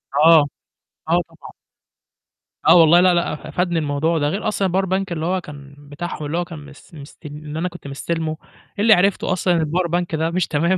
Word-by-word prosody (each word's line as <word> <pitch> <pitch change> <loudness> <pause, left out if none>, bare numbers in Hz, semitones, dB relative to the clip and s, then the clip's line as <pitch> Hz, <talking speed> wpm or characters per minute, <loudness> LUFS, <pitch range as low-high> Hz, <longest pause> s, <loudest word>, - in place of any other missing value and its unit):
آه، 160 -1 +6 0.6
آه - - +3
طبعًا. - - -14 1.1
آه - - +7
والله، 170 0 +6
لأ، 185 -1 +4
لأ 170 0 0
أ - - -8
فادني 175 -2 0
الموضوع 155 +3 0
ده. 145 -1 0
غير 205 +5 -3
أصلًا 200 -2 0
الpower 190 +2 0
bank 190 +1 0
اللي 160 -1 -3
هو 185 +2 -1
كان 145 -3 -12
بتاعهم، 145 +2 -7
اللي 155 +4 -3
هو 175 - -1
كان 165 -3 -9
مس 145 +2 -16
مست 145 +1 -13
اللي 150 +1 -7
أنا 180 - -1
كنت 175 -5 -12
مستلمه، 155 +3 -3 0.4
اللي 215 +1 +6
عرفته 190 +1 +1
أصلًا 180 0 +1
إن 165 - +1
الpower 170 +3 -1
bank 175 -2 -4
ده 160 +1 0
مش 180 0 0
تمام، 170 +5 +1
165 Hz, 205 wpm, -20 LUFS, 150-180 Hz, 1.1 s, آه